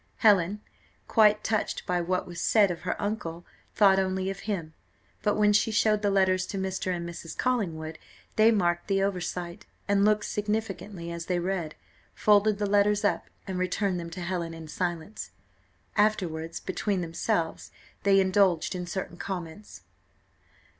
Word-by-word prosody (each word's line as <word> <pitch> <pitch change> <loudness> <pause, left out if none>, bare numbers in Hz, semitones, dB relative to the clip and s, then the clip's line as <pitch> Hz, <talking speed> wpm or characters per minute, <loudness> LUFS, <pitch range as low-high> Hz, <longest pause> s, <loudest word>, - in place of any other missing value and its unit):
Helen, 205 -1 +4 0.5
quite 215 -2 +4
touched 215 -2 -1
by 180 -2 0
what 180 +2 -1
was 175 -1 -7
said 205 -4 +4
of 170 - -6
her - - -3
uncle, 175 -5 -3 0.3
thought 195 -2 +6
only 190 0 0
of 195 - -7
him; 165 -6 -3 0.5
but 210 0 +1
when 210 -1 +4
she 215 - +3
showed 215 -1 +2
the 205 - +2
letters 185 -1 +2
to 195 - -4
Mr. 190 -1 -2
and 170 -1 -3
Mrs. 165 -1 -8
Collingwood, 165 -11 -1 0.4
they 220 +1 +6
marked 175 -6 +1
the 195 -1 +2
oversight, 180 -1 -3 0.2
and 200 -1 +3
looked 210 0 +3
significantly 210 -4 -3
as 170 0 -6
they 180 - +1
read, 175 -3 -2 0.4
folded 210 0 +4
the 205 - -1
letters 205 +1 +3
up - - 0 0.2
and 190 -2 -3
returned 185 0 0
them 170 0 -6
to 175 +2 -7
Helen 175 -2 -3
in 160 -1 -9
silence. 175 +4 -4 0.7
Afterwards 175 -6 0
between 195 0 -2
themselves, 170 +1 -2 0.3
they 195 -1 +5
indulged 190 -3 +3
in 180 -1 -4
certain 175 -1 -5
comments. 180 +1 -7
190 Hz, 155 wpm, -28 LUFS, 175-205 Hz, 0.7 s, thought